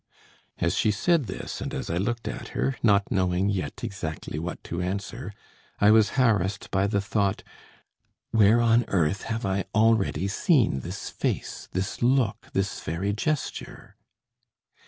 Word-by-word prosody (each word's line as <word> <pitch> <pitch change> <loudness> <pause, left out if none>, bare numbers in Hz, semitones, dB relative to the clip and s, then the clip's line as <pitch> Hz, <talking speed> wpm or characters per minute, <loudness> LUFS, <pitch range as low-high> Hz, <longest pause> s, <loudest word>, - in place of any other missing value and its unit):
"As 85 0 +1
she 110 - +2
said 150 - +2
this, - - -6
and - - -4
as - - -4
I 85 - -1
looked 115 +5 -2
at - - -5
her, 135 - +1
not 100 -2 +3
knowing 95 -2 +1
yet 90 -8 -3
exactly 80 -5 -4
what 85 +2 -5
to 85 +1 -4
answer, 100 +6 -4 0.5
I 105 +1 +6
was 110 +1 +4
harassed 105 -6 +1
by 95 +1 +2
the 100 0 +1
thought: 100 -1 0 0.9
Where 110 +1 +5
on 115 +1 +4
earth 95 +1 +1
have 115 +1 -3
I 95 -1 0
already 110 -5 +3
seen 110 - +2
this - - -6
face, - - -3
this 95 +1 -3
look, 125 -3 +2
this 95 0 -1
very 90 +6 -2
gesture? 150 +7 -3
100 Hz, 150 wpm, -26 LUFS, 95-115 Hz, 0.9 s, I